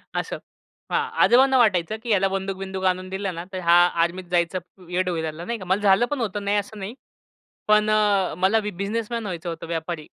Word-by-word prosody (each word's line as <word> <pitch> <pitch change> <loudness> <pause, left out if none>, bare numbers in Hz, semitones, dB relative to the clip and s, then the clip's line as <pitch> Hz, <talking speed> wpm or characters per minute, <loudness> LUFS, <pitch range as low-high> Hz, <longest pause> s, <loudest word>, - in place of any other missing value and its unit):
असं - - -2 0.5
हां, - - 0
आजोबांना 260 +2 +5
वाटायचं 210 -3 +2
की 235 - -6
ह्याला 195 -2 +3
बंदूक-बिंदूक 190 0 -4
आणून 185 0 0
दिलं 190 -2 -3
ना, 170 - -5
तर 185 - -3
हा 170 - +5 0.3
आर्मीत 180 +2 -2
जायचं 175 +1 +1 0.3
वेड 180 +1 -1
होईल 165 -2 -2
ना, 170 - -7
नाही 235 0 -3
का. 185 - -8
मला 190 +3 +1
झालं 200 +4 +4
पण 290 - -1
होतं, 205 -2 -3
नाही 205 +1 +2
असं 205 +1 -4
नाही. 195 +4 -5 0.8
पण 215 0 +4
अ, 205 -4 +2
मला 195 +5 +3
बिझनेसमन 210 +4 -3
व्हायचं 175 -2 -5
होतं, 165 0 -6
व्यापारी. 165 0 -3
190 Hz, 195 wpm, -23 LUFS, 180-210 Hz, 0.8 s, आजोबांना